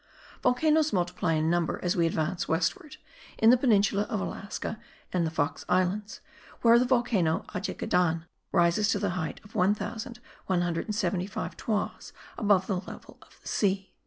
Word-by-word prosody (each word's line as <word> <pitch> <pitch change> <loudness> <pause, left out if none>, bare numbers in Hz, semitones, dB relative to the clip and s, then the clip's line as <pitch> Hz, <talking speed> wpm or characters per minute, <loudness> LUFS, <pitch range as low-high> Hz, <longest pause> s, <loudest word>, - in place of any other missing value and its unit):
Volcanoes 305 +5 +3
multiply 180 -2 0
in 155 0 +1
number 170 0 0
as 180 +2 +1
we 170 -2 +3
advance 165 +2 -1
westward, 265 - -1 0.4
in 225 +1 +6
the - - +7
peninsula 210 -5 +2
of 220 -5 -1
Alaska 200 +3 -5 0.3
and 175 -3 +1
the - - -1
Fox 155 -2 -2
Islands, 185 +4 0 0.4
where 235 0 +7
the 250 - +2
volcano 240 -10 +1
Ajagedan 180 -3 0 0.3
rises 175 +5 +3
to - - +2
the 200 -3 -1
height 175 -3 -4
of 205 - -17
1175 200 -1 -2
toises 215 -3 -3 0.2
above 205 -4 +3
the 190 -2 -1
level - - -11
of - - -20
the - - -11
sea. 195 -2 0
195 Hz, 145 wpm, -28 LUFS, 175-220 Hz, 0.4 s, the